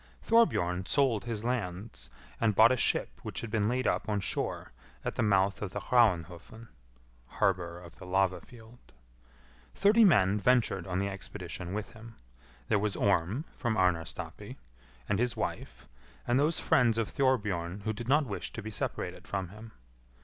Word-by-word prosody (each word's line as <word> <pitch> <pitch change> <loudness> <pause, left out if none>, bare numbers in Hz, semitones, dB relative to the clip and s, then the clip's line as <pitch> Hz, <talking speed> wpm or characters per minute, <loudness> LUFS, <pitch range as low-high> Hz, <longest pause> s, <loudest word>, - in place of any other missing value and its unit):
Thorbjorn 95 - +2
sold 130 -7 +2
his 115 -3 -4
lands, 110 -4 -3 0.3
and 110 -3 +2
bought 110 +4 +7
a - - +3
ship - - 0
which - - -5
had 115 - -6
been 105 -1 +1
laid 130 +1 -1
up - - 0
on 105 -1 +1
shore 95 - -3 0.3
at - - -1
the - - -2
mouth 100 -1 +2
of 100 -3 -4
the - - -2
Hraunhofn 105 -1 0 0.6
(harbour 90 -2 -1
of 85 -1 -14
the - - -11
lava 95 0 +1
field). 120 -1 -17 0.8
Thirty 210 +3 +5
men 105 - +4
ventured 110 -6 +2
on 90 0 -2
the 100 +1 0
expedition 95 -2 -6
with 105 +3 -5
him. 115 0 -12 0.5
There 105 - +2
was 105 0 -1
Orm, 100 - +1
from 115 -3 -2
Arnarstapi, 90 -3 -2 0.5
and 105 - 0
his 125 0 0
wife, - - -5 0.4
and 120 +2 +2
those 155 +3 +2
friends 115 -3 +3
of 115 -2 0
Thorbjorn 105 -9 0
who 110 +2 -2
did 115 +2 -7
not 145 +3 +3
wish 105 -6 -5
to - - -6
be 110 - -6
separated - - -4
from 95 -3 -3
him. 110 +3 -12
105 Hz, 165 wpm, -30 LUFS, 95-120 Hz, 0.8 s, bought